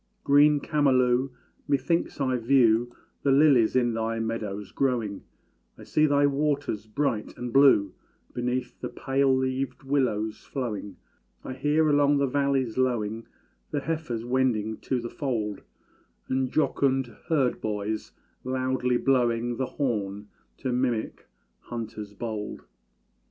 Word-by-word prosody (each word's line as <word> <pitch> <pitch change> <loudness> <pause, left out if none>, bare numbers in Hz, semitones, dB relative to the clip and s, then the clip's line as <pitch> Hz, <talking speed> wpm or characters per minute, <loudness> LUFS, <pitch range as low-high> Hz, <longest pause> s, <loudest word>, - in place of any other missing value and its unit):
Green 145 +1 +5
Camalú! 130 -3 +2 0.4
methinks 145 +4 0
I 130 -2 +1
view 120 -1 +3 0.3
The 140 - +2
lilies 135 -5 +5
in 120 -2 +2
thy 115 0 -2
meadows 105 -3 -4
growing; 120 -7 -1 0.6
I - - -12
see 155 0 +2
thy 145 0 +3
waters 145 -6 -1
bright 110 -1 -2
and 120 -1 -5
blue 130 -9 +5 0.4
Beneath 125 +1 -3
the - - -3
pale 135 0 +1
leaved 130 +1 -2
willows 125 -6 -1
flowing; 105 -7 -4 0.5
I 130 - -5
hear 150 +4 +2
along 145 -1 +4
the 140 - +2
valleys 135 -3 0
lowing, 115 -3 -1 0.4
The 145 - -2
heifers 135 -7 -3
wending 120 -4 0
to 130 - -2
the 120 - -5
fold, 110 -8 -3 0.7
And 130 -1 0
jocund 135 -5 +1
herd 140 -7 +1
boys 105 0 -3 0.3
loudly 130 -1 0
blowing 120 -2 +1
The 130 - -1
horn 105 -6 -3 0.3
to 130 -3 -2
mimic 125 -3 -2 0.3
hunters 110 -3 -7
bold. 110 -2 -5
125 Hz, 125 wpm, -26 LUFS, 115-140 Hz, 0.7 s, Green